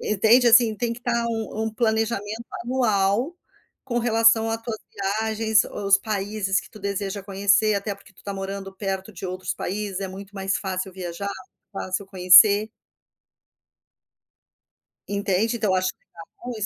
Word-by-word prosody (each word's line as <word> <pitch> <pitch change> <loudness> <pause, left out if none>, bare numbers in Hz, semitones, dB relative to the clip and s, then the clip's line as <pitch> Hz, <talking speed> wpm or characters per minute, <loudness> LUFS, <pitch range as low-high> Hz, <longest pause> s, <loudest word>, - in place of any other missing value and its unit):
Entende, 225 +4 +4
assim 230 -2 +6
tem 235 +1 -1
que 235 - -8
estar 235 -1 0
um 225 -1 -3
um 220 0 -4
planejamento 220 -1 -1 0.2
anual, 235 - +1 0.5
com 240 -2 -1
relação 225 -1 +4
à 225 - -1
tuas 225 -1 -5
viagens, 220 +2 +1
o 205 - -6
os 195 0 +6
países 200 -2 -1
que - - -16
tu 215 - -13
deseja 200 0 -3
conhecer. 200 +2 +2
Até 200 0 -2
porque 200 0 -19
tu - - -19
tá 200 - -5
morando 195 0 -6
perto 195 +1 -4
de 190 +1 -7
outros 185 0 -4
países. 200 0 -4
É 195 - -2
muito 195 +1 -10
mais 195 0 -1
fácil 190 -1 -4
viajar, 180 +1 -5 0.4
fácil 190 0 -4
conhecer. 200 +3 +6 2.4
Entende? 200 +3 0
Tu 205 -4 +1
acha 185 0 +1
que - - -5
tá 170 - -12 0.2
bom, 250 - -5
205 Hz, 155 wpm, -24 LUFS, 195-225 Hz, 2.4 s, assim